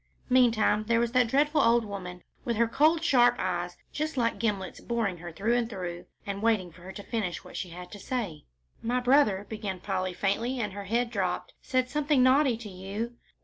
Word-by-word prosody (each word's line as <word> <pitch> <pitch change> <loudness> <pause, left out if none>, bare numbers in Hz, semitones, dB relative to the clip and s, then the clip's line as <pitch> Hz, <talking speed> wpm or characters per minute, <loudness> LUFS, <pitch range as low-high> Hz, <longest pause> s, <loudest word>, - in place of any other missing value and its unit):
Meantime 230 -4 +4
there 230 0 +3
was 235 0 +1
that 250 -1 +4
dreadful 295 +5 +3
old 230 0 +4
woman, 180 -3 -7 0.2
with 235 - -1
her 235 0 +3
cold, 310 +7 +3
sharp 245 -6 +5
eyes 175 -1 -2 0.2
just 305 -1 -2
like 230 -2 +1
gimlets 200 -5 -2
boring 225 -6 -1
her 175 0 -7
through 220 +8 0
and 240 -1 0
through, 180 -5 -6 0.2
and 200 0 -4
waiting 215 -6 +1
for 170 - -17
her 185 +2 -8
to 205 - -9
finish 200 -8 -3
what - - -12
she 185 - -4
had 180 +1 -9
to 205 - -9
say. 200 - -4 0.4
"My 245 +2 0
brother," 245 -6 +3
began 205 -4 -4
Polly, 185 -1 -2
faintly, 225 +8 0
and 210 -4 -2
her 200 0 -6
head 235 +3 0
dropped, 190 -5 -2
"said 255 -1 0
something 290 0 +2
naughty 260 -1 +4
to 225 -2 -8
you." 200 +5 -5
225 Hz, 200 wpm, -28 LUFS, 190-245 Hz, 0.4 s, sharp